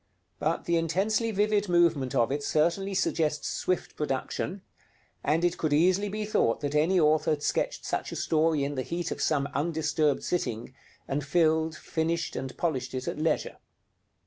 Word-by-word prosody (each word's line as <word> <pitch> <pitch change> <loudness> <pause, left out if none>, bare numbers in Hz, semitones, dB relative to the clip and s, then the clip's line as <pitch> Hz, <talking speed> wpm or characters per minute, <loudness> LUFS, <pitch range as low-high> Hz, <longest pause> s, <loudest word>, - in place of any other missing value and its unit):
But - - -1
the 170 0 +2
intensely 195 +8 +1
vivid 210 -1 +1
movement 170 -7 +2
of 115 +2 +2
it 145 +1 -1
certainly 170 +7 +1
suggests 150 -4 0
swift 185 - -2
production; 150 +6 -3 0.6
and 160 +4 +2
it 175 0 0
could 155 -2 0
easily 185 +6 +3
be 210 +1 -3
thought 115 - +1
that 145 -1 -2
any 165 +5 +3
author 155 -1 +3
had 150 -1 0
sketched - - -1
such - - -2
a - - -5
story 155 -2 +1
in 140 +1 -2
the 130 - -2
heat 170 +4 -3
of - - -4
some 140 -3 +1
undisturbed 155 -1 0
sitting, 120 -9 -2 0.3
and 145 +1 -1
filled, 160 +1 +2
finished, 165 +2 -2
and 130 -1 -5
polished 130 -7 -2
it 130 - -4
at - - -3
leisure. 155 0 0
160 Hz, 170 wpm, -28 LUFS, 145-175 Hz, 0.6 s, easily